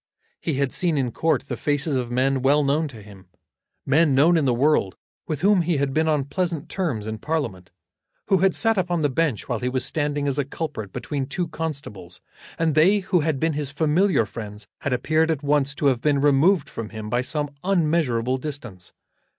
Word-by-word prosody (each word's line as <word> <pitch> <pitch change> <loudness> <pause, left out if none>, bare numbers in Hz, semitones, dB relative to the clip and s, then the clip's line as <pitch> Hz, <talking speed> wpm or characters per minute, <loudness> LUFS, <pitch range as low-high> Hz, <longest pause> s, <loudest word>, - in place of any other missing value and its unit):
He 160 - -2
had 140 -1 0
seen 170 -5 0
in 130 -3 0
court 160 +3 0
the - - -3
faces 145 0 -1
of 125 -2 -1
men 130 +2 +1
well 145 +3 +3
known 150 +3 +1
to 115 -7 -11
him, 100 -3 -15 0.6
men 145 0 +3
known 160 +6 +5
in 160 -4 +2
the 130 - +3
world, 130 -7 +2 0.3
with 155 -2 -3
whom 200 0 +4
he 170 -2 0
had 140 -1 -1
been 160 +2 +1
on 150 -3 +1
pleasant 170 0 -2
terms 145 - -2
in 110 0 -5
Parliament, 115 - -3 0.6
who 195 -2 +3
had 190 0 +3
sat 225 -2 +2
upon 175 -3 -1
the 145 - +2
bench 150 -5 -1
while 120 -4 -2
he 125 - -1
was 130 0 -1
standing 145 -1 -1
as 140 +1 0
a - - +2
culprit 140 - -5
between 140 -3 -4
two 175 +4 -2
constables; 140 - -6 0.4
and 165 -2 +1
they 185 +7 +4
who 185 -1 +1
had 155 -3 0
been 160 +2 +1
his 145 -2 -3
familiar 155 - +2
friends 105 -2 -8
had 140 - -3
appeared 155 +6 +1
at 150 -3 -1
once 140 -1 +1
to 145 - -3
have 130 -4 +3
been 145 -2 +2
removed 145 +4 +3
from 115 -2 -6
him 110 -1 -7
by 120 +3 0
some 145 +2 -2
unmeasurable 150 -9 +1
distance. 125 -10 -8
145 Hz, 205 wpm, -23 LUFS, 130-160 Hz, 0.6 s, known